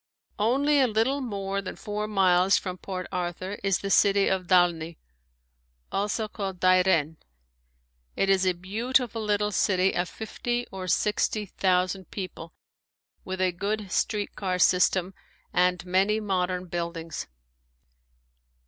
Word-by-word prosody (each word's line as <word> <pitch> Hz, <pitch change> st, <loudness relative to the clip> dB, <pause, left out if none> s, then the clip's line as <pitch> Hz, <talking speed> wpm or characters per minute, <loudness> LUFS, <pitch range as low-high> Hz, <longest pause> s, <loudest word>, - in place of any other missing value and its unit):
Only 275 Hz, +7 st, +3 dB
a 260 Hz, -, +4 dB
little 235 Hz, +6 st, +1 dB
more 200 Hz, -5 st, -3 dB
than 195 Hz, -, -7 dB
four 210 Hz, 0 st, -4 dB
miles 190 Hz, -2 st, +4 dB
from 185 Hz, -1 st, -5 dB
Port 185 Hz, -2 st, -5 dB
Arthur 180 Hz, +2 st, -4 dB
is 195 Hz, -2 st, +2 dB
the 195 Hz, -, -3 dB
city 200 Hz, -1 st, +4 dB
of 185 Hz, -2 st, -1 dB
Dalney, 170 Hz, -3 st, +2 dB, 0.9 s
also 210 Hz, +2 st, -1 dB
called 195 Hz, -3 st, -5 dB
Dairen. 180 Hz, -4 st, +3 dB, 1.0 s
It 195 Hz, -, +1 dB
is 195 Hz, -1 st, +3 dB
a 185 Hz, -1 st, +2 dB
beautiful 225 Hz, +5 st, -1 dB
little 210 Hz, 0 st, 0 dB
city 190 Hz, -1 st, +2 dB
of 175 Hz, 0 st, -1 dB
fifty 240 Hz, +2 st, -3 dB
or 190 Hz, -1 st, -6 dB
sixty 210 Hz, +3 st, +1 dB
thousand 185 Hz, -1 st, 0 dB
people 185 Hz, -4 st, -7 dB, 0.7 s
with 185 Hz, -1 st, -5 dB
a 185 Hz, -1 st, +2 dB
good 200 Hz, +2 st, -3 dB
street 210 Hz, -2 st, -1 dB
car 185 Hz, -2 st, -2 dB
system 185 Hz, +1 st, +3 dB, 0.4 s
and 180 Hz, 0 st, +2 dB
many 190 Hz, +4 st, +2 dB
modern 185 Hz, -3 st, -1 dB
buildings. 170 Hz, -3 st, -5 dB
190 Hz, 130 wpm, -26 LUFS, 180-210 Hz, 1.0 s, a